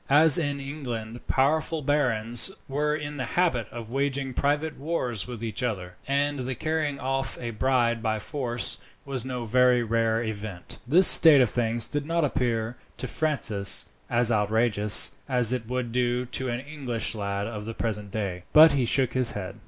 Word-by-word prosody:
As 150 +3 +6
in 145 -3 -3
England 120 -5 -7
powerful 155 +3 0
barons 120 - +1 0.2
were 150 +2 -1
in 150 -1 -7
the 130 - -3
habit 145 - +1
of 115 -1 -10
waging 135 0 -2
private 145 +4 -2
wars 130 - -3
with 120 -2 -8
each 115 +2 -3
other, 95 -7 -4
and 140 +1 -1
the 130 0 -4
carrying 155 0 -3
off 135 -2 -3
a 120 -1 -5
bride 120 0 0
by 110 -1 -1
force 120 0 -4 0.3
was 135 -4 -4
no 125 -2 -5
very 125 +1 +2
rare 115 0 -1
event, 105 -4 -6
this 175 +8 +5
state 155 -4 +8
of 125 -4 +2
things 115 -1 +1
did 145 0 -4
not 165 -1 0
appear, 120 -3 -2 0.2
to - - -4
Francis, 115 -11 +2 0.2
as 120 0 +3
outrageous 105 0 +4 0.2
as 125 -2 +4
it 120 -3 -5
would 125 -1 -4
do 125 0 -1
to 130 +1 -3
an 120 +1 -4
English 135 -7 -4
lad 100 -2 -4
of 105 -2 -7
the 115 0 -7
present 105 -3 -4
day, 95 -4 -5
but 155 +1 +8
he 135 -3 0
shook 130 +1 +1
his 130 -3 -1
head. 95 -1 -7
125 Hz, 175 wpm, -25 LUFS, 115-140 Hz, 0.3 s, state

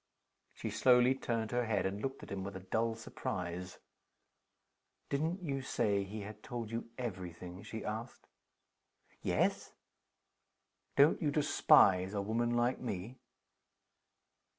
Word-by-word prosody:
She - - -4
slowly 125 0 +5
turned 115 -4 -2
her 120 0 +1
head, 105 -3 +1
and 100 +2 -2
looked 135 +2 -4
at - - -10
him 95 -1 -3
with 100 0 -6
a - - -4
dull 115 0 +1
surprise. 90 -5 -5 1.3
"Didn't 160 +6 -1
you 135 -4 -2
say 100 -6 +1
he 105 +2 -6
had 105 +1 -8
told 120 -3 -5
you 115 0 -4
every 95 -8 -4
thing?" 90 +2 -9
she 110 +1 -6
asked. 110 +3 -5 1.0
"Yes." - - 0 1.2
"Don't 145 +3 +5
you 150 - +2
despise 100 -9 +5
a 100 - +1
woman 120 +3 0
like 120 +2 +2
me?" 115 +2 -5
110 Hz, 130 wpm, -34 LUFS, 100-125 Hz, 1.3 s, slowly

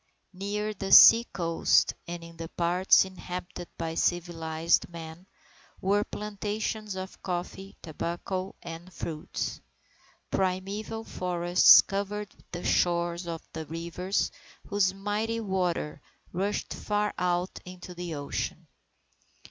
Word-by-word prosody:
Near 205 +3 -2
the 195 -1 -5
sea 230 +1 +10
coast, 170 -6 +2
in 170 -1 -7
the 165 0 -6
parts 180 +3 +4
inhabited 180 -1 -7
by 165 -1 -3
civilized 165 -1 +1
men, 165 +1 -9 0.5
were 200 +2 +2
plantations 210 0 -4
of 190 +1 -7
coffee, 190 +1 -5
tobacco, 175 +4 -4
and 170 +2 -8
fruits. 160 -3 -4 0.7
Primeval 195 +4 -2
forests 180 -2 +6
covered 205 +1 -4 0.2
the 175 0 -5
shores 175 0 +1
of 165 -1 -5
the 160 -1 -5
rivers 170 +4 -2 0.4
whose 200 -2 +3
mighty 210 +4 -2
waters 185 -7 -1 0.3
rushed 195 +4 -2
far 210 0 -1
out 180 0 0
into 180 0 -9
the 175 -2 -5
ocean. 145 -1 -4
180 Hz, 110 wpm, -28 LUFS, 170-200 Hz, 0.7 s, sea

